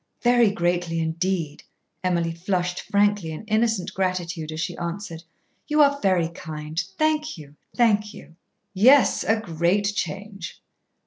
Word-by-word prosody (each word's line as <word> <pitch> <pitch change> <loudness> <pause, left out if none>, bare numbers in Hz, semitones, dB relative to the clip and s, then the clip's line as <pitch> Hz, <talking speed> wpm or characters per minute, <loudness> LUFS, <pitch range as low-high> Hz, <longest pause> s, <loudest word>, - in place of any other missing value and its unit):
"Very 240 -2 +5
greatly 175 -3 -1
indeed," 165 -1 -2 0.4
Emily 170 -2 +1
flushed 180 +1 -2
frankly 205 -4 +2
in 160 +5 -6
innocent 220 -2 0
gratitude 180 -4 -2
as 155 - -6
she - - -3
answered. 170 -1 -5 0.5
"You 300 0 +1
are 280 0 +2
very 180 -4 +2
kind. 155 -1 -5 0.2
Thank 310 -3 0
you, 145 -2 -13 0.2
thank 210 -3 +2
you." 165 - -14 0.4
"Yes, 255 +8 +5
a 225 0 +2
great 195 +2 0
change." 200 -2 -5
185 Hz, 130 wpm, -24 LUFS, 165-210 Hz, 0.5 s, Very